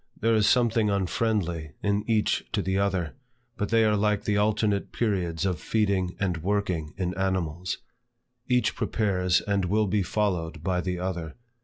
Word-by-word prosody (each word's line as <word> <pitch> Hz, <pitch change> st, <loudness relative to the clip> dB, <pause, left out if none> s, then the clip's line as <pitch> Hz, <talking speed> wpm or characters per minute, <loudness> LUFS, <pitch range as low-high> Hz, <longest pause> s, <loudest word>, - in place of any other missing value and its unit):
There 115 Hz, +1 st, +2 dB
is 110 Hz, -1 st, +3 dB
something 115 Hz, -3 st, +3 dB
unfriendly 95 Hz, -5 st, -1 dB
in 100 Hz, 0 st, +1 dB
each 110 Hz, -2 st, +2 dB
to -, -, 0 dB
the 95 Hz, +1 st, 0 dB
other, 95 Hz, -4 st, 0 dB, 0.4 s
but 105 Hz, -, -2 dB
they 115 Hz, -1 st, +4 dB
are 105 Hz, -1 st, +3 dB
like 105 Hz, 0 st, +1 dB
the 105 Hz, -, 0 dB
alternate 105 Hz, -1 st, +1 dB
periods 95 Hz, -6 st, -1 dB
of 90 Hz, -4 st, 0 dB
feeding 100 Hz, -5 st, 0 dB
and 90 Hz, -4 st, 0 dB
working 90 Hz, -3 st, -1 dB
in 90 Hz, -2 st, -1 dB
animals; 90 Hz, -2 st, -1 dB, 0.7 s
each 125 Hz, -1 st, +2 dB
prepares 90 Hz, -5 st, +1 dB
and 100 Hz, -2 st, 0 dB
will 105 Hz, +4 st, +2 dB
be 100 Hz, +1 st, +1 dB
followed 90 Hz, -5 st, -1 dB
by 90 Hz, 0 st, 0 dB
the 90 Hz, 0 st, -2 dB
other. 90 Hz, -3 st, -4 dB
100 Hz, 160 wpm, -27 LUFS, 90-105 Hz, 0.7 s, they